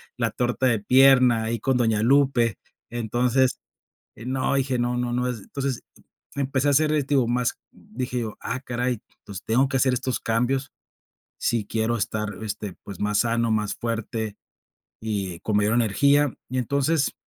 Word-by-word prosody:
la 115 -2 -1
torta 125 +2 -1
de 115 -3 +2
pierna, 125 0 +5
ahí 115 +1 -2
con 130 +5 +1
doña 115 -4 +2
Lupe, 125 -2 +3 0.3
entonces, 120 +2 +1 0.6
eh, 115 - -10
no, 130 +2 0
dije: 135 -2 0
"No 120 0 0
no 120 0 -1
no", 125 +1 0
entonces, 125 +3 -4 0.5
empecé 140 0 0
a - - +5
hacer, 155 +2 +3
este, 145 -2 0
digo, 130 -4 +3
más 125 0 0
dije 125 +2 -5
yo: 110 -2 -5
"Ah 125 - -3
caray, 125 -2 -2 0.2
entonces 100 -3 -10
tengo 130 +5 +2
que 135 - -1
hacer 130 0 +3
estos 125 0 -1
cambios 125 +4 0 0.7
si 115 -3 0
quiero 115 +2 0
estar, 105 +1 -2
este, 105 -2 -5
pues, 100 -3 -9
más 105 0 +1
sano, 115 0 +1
más 105 -2 0
fuerte 115 -2 -3 0.7
y 100 -6 -3
con 105 - -1
mayor 105 +2 +2
energía", 140 +5 +3 0.2
y 130 - -2
entonces 140 +4 +1
120 Hz, 165 wpm, -24 LUFS, 110-130 Hz, 0.7 s, pierna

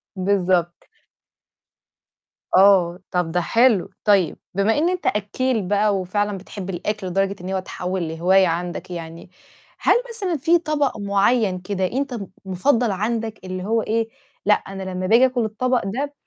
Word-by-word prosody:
بالضبط 185 -3 0 1.7
آه، 185 -2 +5
طب 180 -2 0
ده 175 +1 +1
حلو، 230 -1 +3
طيب 200 -5 +3 0.2
بما 200 +5 +2
إن 330 +4 +2
أنت 365 -1 -3
أكّيل 220 +4 0
بقى 205 +1 +2
وفعلًا 205 +2 -1
بتحب 190 0 -8
الأكل 195 +2 -3
لدرجة 195 +2 0
إن 180 - -6
هو 190 - 0
تحوّل 180 -1 -4
لهواية 185 +4 +3
عندك 175 +2 -3
يعني، 165 0 -8 0.5
هل - - +4 0.2
مثلًا 390 -8 -2
في 325 +5 +3
طبق 300 -6 -1
معيّن 200 0 +1
كده 185 +1 -2
أنت 270 +1 -2
م 205 -5 -5 0.2
مفضّل 225 +5 +1
عندك؟ 220 +2 -2
اللي 185 0 -5
هو 225 +2 +1
إيه، 225 +1 -1 0.4
لأ 210 - +6
أنا 195 -1 -4
لمّا 185 0 -3
باجي 235 +6 +6
آكل 250 -3 0
الطبق 250 +4 0
ده 275 +9 -3
200 Hz, 150 wpm, -22 LUFS, 185-230 Hz, 1.7 s, لأ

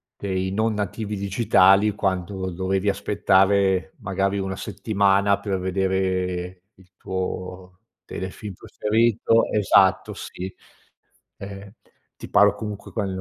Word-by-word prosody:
dei 95 -1 -2
non 110 +2 0
nativi 105 +1 -3
digitali, 100 0 +3
quando 95 -1 -2
dovevi 95 +3 -1
aspettare 95 -1 +2
magari 100 0 -1
1 95 -1 -3
settimana, 100 -1 +1
per 100 -1 -2
vedere 95 -1 -1
il 95 -1 -22
tuo 95 0 -5 0.3
telefilm 95 +2 -7
preferito 115 +4 +1
Esatto, 95 -2 +3
sì. 95 +1 -7 0.9
Ehm, 100 0 -9 0.4
ti - - -10
parlo 105 0 +5
comunque, 105 -1 -7
quando 100 -4 -2
95 Hz, 105 wpm, -23 LUFS, 95-100 Hz, 0.9 s, parlo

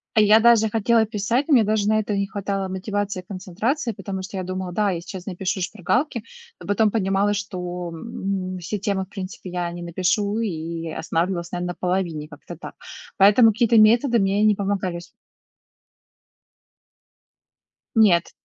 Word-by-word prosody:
А 215 - +6
я 210 +1 +6
даже 225 -2 +5
хотела 225 +1 +2
писать, 230 +5 -1
мне 260 -7 +6
даже 210 -1 +1
на 215 0 +3
это 210 -1 -2
не 200 0 0
хватало 195 -1 -3
мотивации 200 0 -3
и 180 - -20
концентрации, 210 - -2
потому 190 -1 -6
что 190 +1 -7
я 185 - -2
думала: 185 0 -4
"Да, 205 +2 +1
я 170 - -2
сейчас 180 +1 -9
напишу 190 0 -3
шпаргалки", 220 - -1 0.4
но - - -10
потом 205 +1 +2
понимала, 195 -1 +1
что, 180 -4 -4
м, 190 -1 -4
все 190 +4 -4
темы, 200 -2 -1
в 185 - -23
принципе, 190 -2 -7
я 175 -1 -2
не 175 0 -7
напишу, 195 +5 0
и 165 -5 -4
останавливалась, 170 +2 -2
наверно, 180 0 -3
на - - -38
половине. 175 -5 -2
Как-то 155 +2 -11
так. - - -10 0.4
Поэтому 210 +3 +6
какие-то 230 +1 +3
методы 235 +3 +5
мне 200 +1 +1
не 210 -2 +4
помогали 195 -3 -2
с 175 - -12 2.9
Нет. 190 -6 +4
195 Hz, 165 wpm, -23 LUFS, 180-215 Hz, 2.9 s, А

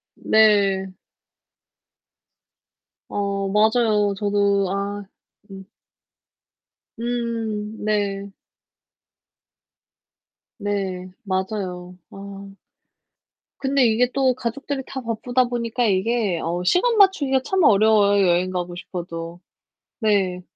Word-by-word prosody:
네. 200 -3 +3 2.1
어 200 -1 -2
맞아요. 210 -1 +2
저도 200 -1 +1
아 200 +1 -3 0.5
음. 195 0 -10 1.3
음. 230 -3 -3
네. 200 -2 -1 2.3
네. 190 -3 -3
맞아요. 185 -2 -4
아. - - -13 1.4
근데 270 -1 +2
이게 235 +2 +2
또 260 -2 +2
가족들이 265 +3 -4
다 265 - -6
바쁘다 245 +2 0
보니까 240 0 -2
이게 200 -2 +1
어 175 +2 -2
시간 435 - +2
맞추기가 285 -10 +4
참 380 +2 +1
어려워요 205 -4 +4
여행 175 +1 +2
가고 180 -1 -4
싶어도. 170 -1 -7 0.6
네. 195 -5 +1
205 Hz, 160 characters per minute, -22 LUFS, 190-235 Hz, 2.3 s, 맞추기가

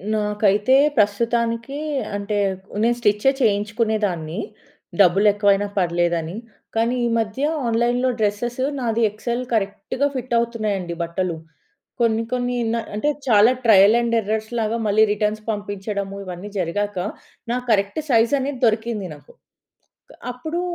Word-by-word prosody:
నాకైతే 210 +3 +2 0.2
ప్రస్తుతానికి 230 +5 0 0.4
అంటే 205 +1 -2 0.5
నేను 240 +1 +2
స్టిచ్చె 210 +4 +3
చేయించుకునేదాన్ని. 210 -5 0 0.6
డబ్బులేక్కువైనా 200 +2 +4
పర్లేదని, 170 -1 0 0.4
కానీ 230 +2 +1
ఈ - - +2
మధ్య 225 +5 -2 0.2
ఆన్‌లైన్‌లో 240 +2 +1
డ్రెసెస్ 220 +4 -1 0.2
నాది 230 -1 0
ఎక్సెల్ 235 +4 -3
కరెక్ట్‌గా 205 +6 -1
ఫిటవుతున్నాయండి 230 -7 -1
బట్టలు. 170 0 -2 0.6
కొన్ని 230 -1 +2
కొన్ని 245 0 -1 0.2
న - - +1 0.2
అంటే 290 +8 0 0.2
చాలా 220 +1 +6
ట్రయల్ 210 -1 +6
అండ్ 235 0 0
ఎర్రర్స్ 220 +2 -3
లాగా 225 +1 0
మళ్ళీ 215 +2 +4
రిటర్న్స్ 210 +1 -1
పంపించడము 200 -1 -4
ఇవన్నీ 185 +3 -7
జరిగాక, 205 +3 -2 0.5
నా 245 - +1
కరెక్ట్ 200 +6 +1
సైజ్‌ 230 +2 +3
అనేది 265 -1 -3
దొరికింది 220 -3 0
నాకు. 145 -1 -18 1.0
అప్పుడు 315 +8 -4
215 Hz, 115 wpm, -21 LUFS, 200-235 Hz, 1.0 s, చాలా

